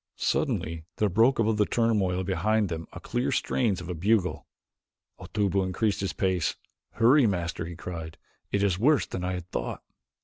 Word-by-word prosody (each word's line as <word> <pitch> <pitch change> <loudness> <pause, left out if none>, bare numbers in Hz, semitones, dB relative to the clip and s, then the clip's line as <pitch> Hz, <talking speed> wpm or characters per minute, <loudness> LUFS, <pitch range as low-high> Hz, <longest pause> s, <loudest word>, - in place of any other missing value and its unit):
Suddenly 80 0 -1
there 105 - +1
broke 115 +8 +4
above 110 -1 +2
the 105 - +3
turmoil 100 -6 +1
behind 100 +3 +1
them 80 -1 -5
the - - -8
clear 120 +1 -1
strains 110 -8 +1
of - - -8
a 90 - -3
bugle. 95 +2 0 0.7
Otobu 100 -2 0
increased 100 +3 0
his 95 - -1
pace. 90 -4 0 0.4
"Hurry, 125 +3 +5
Master," 85 -4 -2
he 85 - -7
cried, 80 -2 -7 0.3
"it 100 0 +1
is 95 -3 +1
worse 145 +5 +4
than 90 - -5
I 90 0 -1
had 90 -1 -5
thought." - - -4
95 Hz, 170 wpm, -27 LUFS, 90-110 Hz, 0.7 s, Hurry